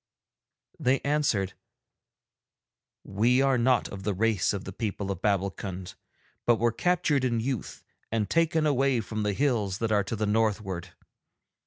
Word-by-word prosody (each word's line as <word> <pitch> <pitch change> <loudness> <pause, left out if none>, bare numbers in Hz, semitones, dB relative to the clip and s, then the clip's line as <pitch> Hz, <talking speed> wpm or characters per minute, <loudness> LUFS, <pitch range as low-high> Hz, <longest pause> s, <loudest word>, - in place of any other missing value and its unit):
They 130 +2 +2
answered: 140 -10 0 1.5
'We 120 +7 +2
are 135 -2 +3
not 125 -1 +3
of 100 - -7
the 100 0 -1
race 110 -1 +2
of 100 -2 -4
the - - -7
people 100 -3 -3
of 95 -2 -5
Babbulkund, 95 -2 -2 0.5
but 120 - +6
were 115 +1 +1
captured 150 0 +1
in 120 -3 +1
youth 125 -2 -4 0.3
and 110 -2 0
taken 160 - +2
away 135 -3 +2
from 110 0 -4
the 105 -1 0
hills 110 -7 0
that 115 0 -1
are 105 -1 +3
to 115 - -3
the 110 0 -1
northward. 105 -5 -1
110 Hz, 150 wpm, -27 LUFS, 100-130 Hz, 1.5 s, but